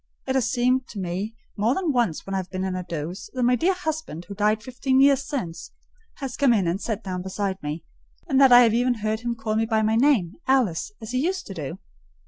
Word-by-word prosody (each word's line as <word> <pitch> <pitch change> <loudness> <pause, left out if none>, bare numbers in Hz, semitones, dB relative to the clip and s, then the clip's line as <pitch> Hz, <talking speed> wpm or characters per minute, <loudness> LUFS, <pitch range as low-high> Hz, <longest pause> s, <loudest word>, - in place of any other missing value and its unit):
It 265 - -1
has 255 -3 +1
seemed 255 +1 +1
to 205 - -8
me 190 +5 -3 0.2
more 225 +5 +1
than 360 -5 0
once 235 -10 0
when 195 - -5
I - - +1
have 185 -1 -4
been 185 0 -3
in 190 -1 -2
a 185 - -2
doze, 170 +1 -6
that 255 - 0
my 250 +1 +4
dear 365 +8 +2
husband, 315 - -4
who 200 - -8
died 210 +2 +1
fifteen 260 +2 0
years 275 0 +4
since, 180 - -5 0.4
has 270 -4 -5
come 275 -4 +4
in 200 -5 +2
and 180 +4 -1
sat 220 -1 -3
down 185 -2 -4
beside 190 +1 -3
me; 150 +2 -4 0.4
and 270 -4 +3
that 270 -2 +7
I 245 0 +10
have 230 -3 +4
even 245 +1 +2
heard 215 0 -2
him 240 0 -3
call 220 -1 -2
me 225 +1 +1
by 220 -1 +1
my 220 +1 +2
name, 230 - +2
Alice, 245 -11 +1
as 220 - -6
he 255 - 0
used 365 +6 -1
to 195 - -7
do. 155 0 -5
225 Hz, 245 wpm, -24 LUFS, 190-260 Hz, 0.4 s, I